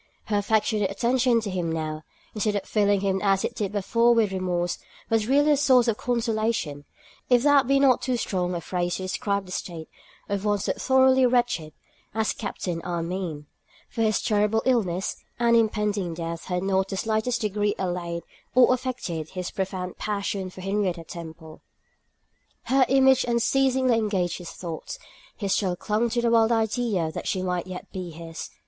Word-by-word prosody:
Her 210 - +2
affectionate 210 -1 +1
attention 240 +3 +2
to 205 -3 -4
him 175 -3 -2
now, 155 -1 -3 0.3
instead 210 -1 0
of 200 - -1
filling 205 -2 +2
him 190 -1 0
as 195 -1 +2
it - - -3
did 205 -4 -3
before 230 +4 +3
with 220 -4 +2
remorse, 180 -2 -1 0.3
was 220 -1 +2
really 290 +3 +4
a - - +6
source 260 -4 +4
of 225 -2 +1
consolation, 220 - -1 0.4
if 245 -1 +4
that 285 -3 +5
be 275 0 +4
not 270 -3 +4
too 255 -2 0
strong 180 -5 -1
a 170 - -3
phrase 175 0 -2
to 190 - -5
describe 200 +1 -1
the 180 - -11
state 170 -3 -5 0.4
of 200 -1 -2
one 205 -1 +2
so 195 - -1
thoroughly 260 -1 +4
wretched 240 -11 0 0.4
as 220 -1 +1
Captain 180 -5 -4
Armine; 170 -2 -4 0.5
for 230 - -3
his 215 -1 +2
terrible 210 0 +2
illness 195 -8 0 0.2
and 235 -1 +4
impending 210 -5 +1
death 165 0 -5
had 180 0 -2
not 195 0 +1
in - - -2
the - - -4
slightest 220 +4 0
degree 205 -1 0
allayed 175 -2 -3 0.3
or 255 0 +6
affected 240 - -4
his 185 -1 -5
profound 185 -1 -4
passion 200 -2 -2
for 185 - -11
Henrietta 190 -3 -1
Temple. 160 -1 -10 1.0
Her 265 0 +3
image 265 0 +5
unceasingly 255 +1 +2
engaged 190 -6 -1
his 175 - -8
thoughts; 165 -3 -6 0.4
he 205 - -3
still 190 -2 +1
clung 215 +6 0
to 240 +1 -1
the 235 - +2
wild 225 0 +4
idea 220 -6 0
that - - -6
she 185 -2 -1
might 180 -1 -2
yet 185 -1 -8
be 185 -2 -5
his. 165 0 -8
205 Hz, 175 wpm, -25 LUFS, 180-235 Hz, 1.0 s, a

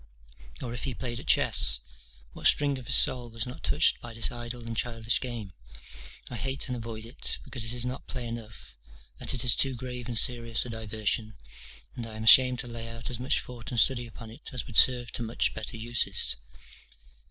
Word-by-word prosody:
Or, 120 -2 -5
if 120 - -4
he 130 -3 -3
played 120 -1 -4
at - - -11
chess? - - +4 0.5
what - - +2
string 140 -2 +4
of 125 - -12
his - - +4
soul 125 -4 +4
was 115 0 -4
not 125 +2 -9
touched 150 +3 +3
by 120 -1 -9
this 115 +4 +1
idle 120 0 -7
and 115 0 -5
childish 115 -1 -1
game? 115 -7 -6 0.7
I 120 - -6
hate 135 +2 -2
and 125 - -3
avoid 115 -2 -7
it, 115 - -3
because 125 -4 -6
it 115 - -1
is 120 0 -3
not 125 +2 -6
play 125 -2 -5
enough, 115 - -9 0.4
that - - +1
it 125 - +1
is 120 -3 +5
too 135 -2 +1
grave 125 0 -6
and 120 -2 -3
serious 115 -1 +2
a - - -7
diversion, 110 0 -2 0.6
and 120 -2 -5
I 110 - -9
am 110 - -6
ashamed 125 +3 +8
to 125 - -7
lay 115 -1 -6
out 115 +1 -6
as 120 - -3
much 130 +2 +1
thought 120 -3 -9
and 120 - 0
study 120 0 +3
upon 115 0 -11
it 130 +7 -9
as 125 -3 -4
would 120 - -11
serve 120 -3 +5
to - - -3
much 115 0 0
better 110 +2 -4
uses. 110 -4 0
120 Hz, 210 wpm, -28 LUFS, 115-125 Hz, 0.7 s, ashamed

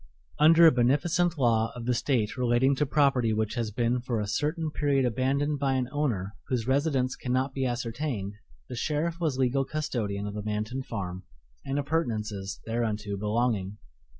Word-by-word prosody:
Under 165 +2 +7
a 160 - +9
beneficent 155 +8 +2
law 115 -4 +2
of 120 -1 -6
the 125 - +2
State 120 -3 0
relating 125 +2 +3
to 150 - +1
property 135 -6 +3
which 110 0 -1
has 115 -3 -2
been 120 +3 0
for 120 -2 -2
a 105 - -1
certain 155 - -1
period 140 -3 +1
abandoned 135 +4 0
by 135 -1 +1
an 130 -1 0
owner 110 -9 -1
whose 125 -4 -1
residence 135 -2 +1
cannot 130 +2 -1
be 135 -1 0
ascertained, 120 -3 -3 0.3
the - - -6
sheriff 155 +6 -1
was 155 -6 0
legal 130 +1 +2
custodian 120 -10 -3
of 105 - -4
the 105 - -4
Manton 110 +5 -3
farm 95 -7 -5 0.4
and 135 +1 -2
appurtenances 110 - -2
thereunto 110 -3 -2
belonging. 105 -1 -1
125 Hz, 165 wpm, -28 LUFS, 110-140 Hz, 0.4 s, a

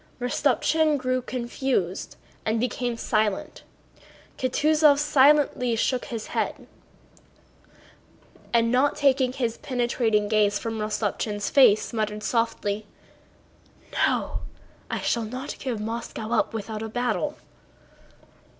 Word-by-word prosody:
Rostopchín 295 +5 +2
grew 255 -1 -1
confused 245 -6 -2 0.3
and 220 +1 0
became 245 0 -2
silent. 215 -3 -1 0.8
Kutúzov 300 +3 +4
slightly 285 -4 +4
shook 250 +2 0
his 230 -3 -5
head - - -2 1.9
and 230 -1 +3
not 260 +3 +3
taking 265 -3 +3
his 240 -3 -2
penetrating 235 -4 0
gaze 210 -1 +2
from 225 -1 -4
Rostopchín's 210 -1 -2
face 245 -5 +5
muttered 210 -1 -2
softly: 215 -2 -1 1.2
"No! - - -1 0.5
I - - -2
shall 235 - 0
not 255 +5 -6
give 255 -3 -3
up 210 - -5
Moscow 225 -1 -2
without 220 0 -5
a 220 - -4
battle!" 245 +6 -1
235 Hz, 105 wpm, -25 LUFS, 215-260 Hz, 1.9 s, face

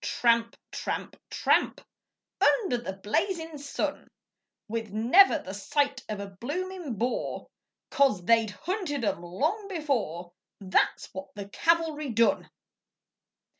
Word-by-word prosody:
Tramp, 230 -1 +2
tramp, - - -4
tramp - - +2 0.6
Under 385 - +3
the 195 -5 -5
blazin' 320 - -2
sun, 280 0 -3 0.6
With 225 0 -3
never 255 - +6
the 190 -10 -8
sight 270 +6 0
of 210 -1 -3
a 200 - -4
bloomin' 295 - -5
Boer, 240 +5 -2 0.5
'Cause 260 -11 +3
they'd 225 0 +4
hunted 305 - -3
'em 185 - -1
long 310 - -1
before 235 - -2 0.3
That's 190 -2 +1
what 190 +2 -8
the 200 -1 -7
cavalry 320 +1 +1
done! 230 0 +2
245 Hz, 115 wpm, -28 LUFS, 205-320 Hz, 0.6 s, never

